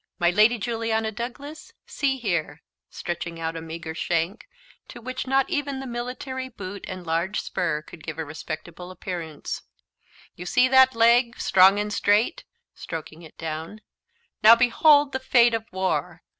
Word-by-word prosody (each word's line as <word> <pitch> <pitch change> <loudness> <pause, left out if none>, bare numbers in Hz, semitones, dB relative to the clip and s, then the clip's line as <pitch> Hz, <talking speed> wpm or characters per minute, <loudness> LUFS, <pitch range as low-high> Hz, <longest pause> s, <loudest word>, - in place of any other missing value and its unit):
"My 175 0 +3
lady 215 +6 +4
Juliana 225 -1 -1
Douglas, 275 +7 -8
see 270 -2 -1
here," 180 -10 -2 0.3
stretching 170 -1 -5
out 165 0 -3
a 165 - -5
meagre 160 0 -7
shank, 170 +5 -2 0.4
to - - -10
which 255 +2 -5
not 270 0 +2
even 285 -2 -2
the 270 - -6
military 255 +2 -5
boot 200 -4 -8
and 185 -1 -7
large 170 +5 -1
spur 155 -4 -2
could 160 - -13
give 155 -1 -6
a 160 - -3
respectable 160 +3 -7
appearance: 170 -4 -6 0.7
"You 180 - -8
see 250 +7 +4
that 260 -1 +6
leg 235 +1 +4
strong 190 +1 +5
and 210 0 -2
straight," 210 - +1 0.3
stroking 160 0 -8
it 160 - -14
down; 160 +6 -6 0.6
"now, 225 +1 +9
behold 285 +4 +4
the 260 - -2
fate 240 -2 +4
of 225 -1 -2
war!" 180 -2 -2
210 Hz, 155 wpm, -25 LUFS, 170-245 Hz, 0.7 s, now